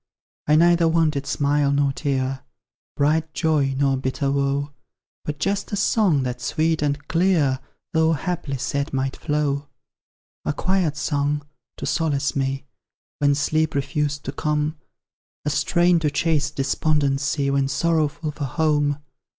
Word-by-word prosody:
I 150 - +5
neither 170 +1 +5
wanted 155 -4 +1
smile 145 0 +1
nor 140 -1 +2
tear, 135 -2 -1 0.6
Bright 155 +2 +1
joy 150 -5 +1
nor 135 -1 +2
bitter 130 +1 -1
woe, 140 +1 0 0.5
But 150 0 -3
just 195 +6 -1
a - - 0
song 195 - +2
that 125 -1 -4
sweet 160 +6 0
and 145 0 -1
clear, 165 -7 +2 0.3
Though 160 0 +3
haply 155 -3 -3
sad, 140 +4 -2
might 135 0 -1
flow. 145 -2 -1 0.8
A - - -1
quiet 180 -2 0
song, 145 -1 -1 0.3
to - - -5
solace 145 -4 0
me 135 0 -1 0.5
When 145 -1 +3
sleep 155 +1 0
refused 145 +1 -1
to 135 - -2
come; 150 +1 -1 0.7
A 150 - +1
strain 175 +4 +3
to 155 -2 +1
chase 150 -1 +1
despondency, 140 -1 0
When 140 -1 +2
sorrowful 155 +1 0
for 145 -1 -4
home. 145 0 +1
145 Hz, 135 wpm, -23 LUFS, 140-160 Hz, 0.8 s, I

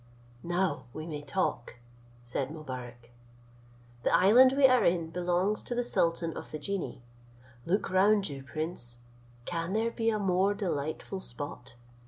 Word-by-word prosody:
"Now 175 -6 -1
we 155 - -6
may 150 -3 -5
talk," 135 -4 -2 0.5
said 125 +2 -3
Mobarec: 125 -6 -8 0.9
"the - - +1
island 245 +7 +7
we 275 0 +5
are 255 -1 +6
in 170 -2 +1
belongs 180 +4 0
to 240 - -4
the 245 - +1
sultan 165 -7 0
of - - -7
the 155 - -5
genii. 180 -5 -4 0.6
Look 195 +2 0
round 200 +2 +4
you, 140 -2 -6
prince; 135 -4 -2 0.4
can 170 +1 -3
there 225 +2 +1
be 225 -1 0
a 215 - +1
more 195 0 +2
delightful 175 -1 -3
spot? 125 -4 -7
170 Hz, 145 wpm, -30 LUFS, 145-200 Hz, 0.9 s, island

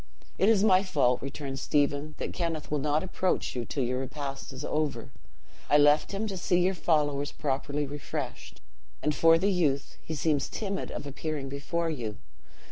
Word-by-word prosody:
"It 195 - +5
is 210 -3 +4
my 190 -3 +6
fault," 140 -10 +2
returned 135 0 -5
Stephen, 145 +1 +1
"that - - -4
Kenneth 165 -4 -3
will 150 - +1
not 150 +3 +1
approach 185 -4 -1
you 120 -1 -2
till 135 - -2
your 125 +1 0
repast 135 +1 -5
is 130 - -6
over. 145 -6 -1 0.6
I 145 - +6
left 145 +1 +5
him 200 +2 -2
to 195 -3 -3
see 175 0 +2
your 185 +2 +3
followers 145 -5 +1
properly 145 +1 -1
refreshed. 145 -1 -6 0.4
And 150 - +2
for 165 +2 +6
the 195 +4 +2
youth, 150 -7 0
he 160 - -5
seems 145 -1 +1
timid 200 -2 -3
of - - -5
appearing 145 0 -4
before 165 +4 -2
you. 115 -8 -4
150 Hz, 175 wpm, -29 LUFS, 140-170 Hz, 0.6 s, my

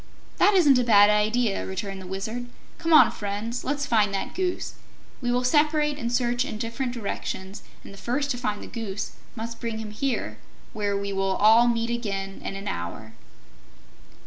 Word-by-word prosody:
"That 415 - +5
isn't 290 -8 +6
a - - +2
bad 210 -3 +6
idea," 210 +1 +1
returned 190 0 -5
the 185 - -9
Wizard. 220 +6 -4 0.3
"Come 330 0 -1
on, 310 - +8
Friends; 210 +4 -4
let's 285 +1 -1
find 215 -6 +3
that 195 - -3
Goose. 365 -1 -2 0.5
We 245 -1 0
will 250 +1 +1
separate 300 +2 +2
and 235 -3 -2
search 245 0 +1
in 275 -6 -5
different 235 +3 -3
directions, 200 -3 -5 0.2
and - - -11
the 195 - -12
first 265 +8 -1
to 245 - -2
find 210 -4 -2
the - - -8
Goose 210 -4 -5 0.2
must 230 0 -6
bring 230 -2 -3
him 220 -1 -6
here, 255 +4 -2 0.3
where 205 -3 -1
we 200 0 -3
will 195 0 0
all 225 +4 +6
meet 230 0 0
again 195 -5 -3
in - - -4
an 195 +1 -6
hour." 105 - -5
230 Hz, 180 wpm, -25 LUFS, 200-250 Hz, 0.5 s, on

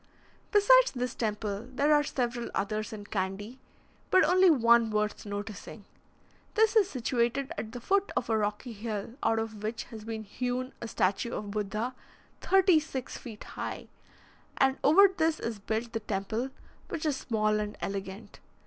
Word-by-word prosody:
Besides - - +6
this 250 0 -2
temple, 210 0 -3
there 285 +4 +3
are 295 - +5
several 245 -4 -2
others 215 +2 -2
in 210 -2 -7
Candy, 205 +5 -4 0.5
but 375 - +6
only 365 +3 +5
one 235 -5 +5
worth 210 0 -1
noticing. 205 0 -6 0.7
This 440 +1 +4
is 410 -3 +5
situated 250 0 0
at 220 - -5
the 245 - -6
foot 390 +10 +1
of - - 0
a 225 - +1
rocky 210 +3 -2
hill, 215 0 -5
out 225 - +2
of 220 -2 -4
which 220 +2 -3
has 220 -2 -8
been 220 0 -5
hewn 250 +4 -3
a 235 - -4
statue 205 +2 0
of 205 -1 -5
Buddha, 215 +4 -2 0.5
thirty 380 -4 +5
six 270 -5 -6
feet 220 -4 -9
high, - - -6 0.7
and 265 0 +3
over 390 +8 +8
this 325 -4 0
is 230 -3 -4
built 220 +3 -3
the 225 - -1
temple, 220 +4 -2 0.4
which 325 -2 -4
is 300 -3 +1
small 215 -4 0
and 210 0 -4
elegant. 195 +1 -6
230 Hz, 160 wpm, -29 LUFS, 210-270 Hz, 0.7 s, over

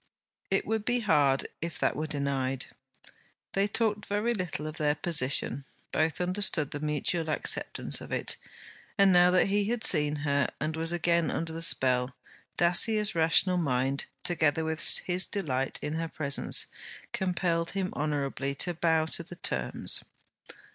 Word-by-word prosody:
It 195 - 0
would 220 0 -2
be 245 +2 0
hard 145 -9 +2
if 165 -1 -5
that - - 0
were 155 +1 -3
denied! 135 -3 -2 0.9
They 195 +1 +1
talked 210 0 -1
very 210 +4 0
little 180 -7 -3
of 155 0 -6
their 150 -1 +1
position; 140 -4 +1 0.3
both 155 0 0
understood 180 -5 0
the 145 - -5
mutual 155 +3 -2
acceptance 155 - +1
of - - -10
it; - - +1 0.6
and 195 -2 +5
now 180 0 +6
that 180 0 +3
he 205 0 +1
had 230 +1 -2
seen 150 -3 +4
her 140 -1 +1
and 155 +2 -3
was 165 +1 +2
again 170 -1 +1
under 165 0 -4
the 165 - -5
spell, 130 -6 +2 0.4
Dacier's 210 +5 +3
rational 170 +3 +2
mind, 135 -3 -1 0.2
together 160 -2 +1
with 160 0 -3 0.2
his 180 +1 +1
delight 135 -9 -2
in 150 +1 -3
her 165 +1 -3
presence, 140 -3 +1 0.5
compelled 170 -3 -1
him 190 -1 -2
honourably 140 -2 -2
to 175 +5 +1
bow 160 -1 +1
to 160 - -4
the 170 +1 -11
terms. - - -1
160 Hz, 155 wpm, -28 LUFS, 145-180 Hz, 0.9 s, now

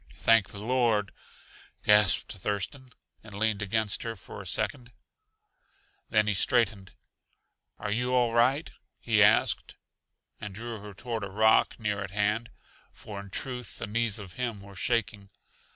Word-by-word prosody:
"Thank 115 -4 +4
the 100 - -8
Lord!" 115 -3 +1 0.7
gasped 105 -3 +4
Thurston, 105 +7 -4 0.3
and 105 -2 -11
leaned 105 0 0
against 105 0 0
her 115 -1 -4
for 95 - -10
a - - -9
second. 125 -4 -2 1.2
Then 105 -2 +3
he 105 - +1
straightened. 100 -3 +1 0.8
"Are 105 - -4
you 125 +4 0
all 120 -2 +2
right?" 130 +6 +2 0.3
he - - +2
asked, - - +3 0.6
and 105 -2 -7
drew 115 +1 -6
her 105 -1 -10
toward 115 0 -4
a 100 - -4
rock 110 +5 +3
near 105 -2 -2
at 100 - -6
hand 105 +4 0 0.4
for 105 -2 -9
in 100 0 -10
truth, 125 +1 -4
the - - -4
knees 110 0 0
of 95 -4 -8
him 120 -5 -3
were 100 0 -13
shaking. 110 -1 -1
110 Hz, 150 wpm, -28 LUFS, 100-120 Hz, 1.2 s, Thank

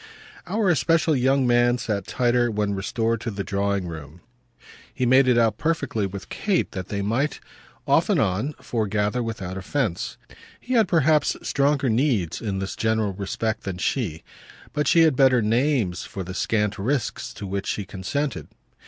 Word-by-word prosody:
Our 200 0 +2
especial 160 +3 +2
young 135 +1 +2
man 120 0 +3
sat 105 -4 -3
tighter 120 -1 +2
when 105 -2 -1
restored 115 +3 -1
to 120 - -3
the 100 -2 -4
drawing 100 -1 -1
room; 80 -1 -9 0.7
he 130 - -1
made 130 +2 +5
it 125 -2 +4
out 115 -2 +2
perfectly 145 -10 0
with 100 +1 -8
Kate 200 -3 0
that 95 -3 -5
they 100 -1 -3
might, 125 +8 0 0.5
off - - +3
and - - +3
on, 105 +11 0
foregather 110 0 -1
without 100 -5 -4
offence. 105 -1 -2 0.4
He 255 - -4
had 225 -5 +4
perhaps 155 -3 +3
stronger 140 -1 +1
needs 110 - +1
in 100 -4 -2
this 95 0 -4
general 110 -2 0
respect 110 +3 -3
than 95 -2 -5
she; 90 - -2 0.5
but 150 0 0
she 170 - +5
had 160 -4 +4
better 130 -2 +5
names 115 - +1
for 95 - -6
the 95 +1 -7
scant 105 0 0
risks 125 +5 -2
to - - -7
which 100 0 -3
she 100 - -2
consented. 115 +9 -3
115 Hz, 165 wpm, -24 LUFS, 100-135 Hz, 0.7 s, made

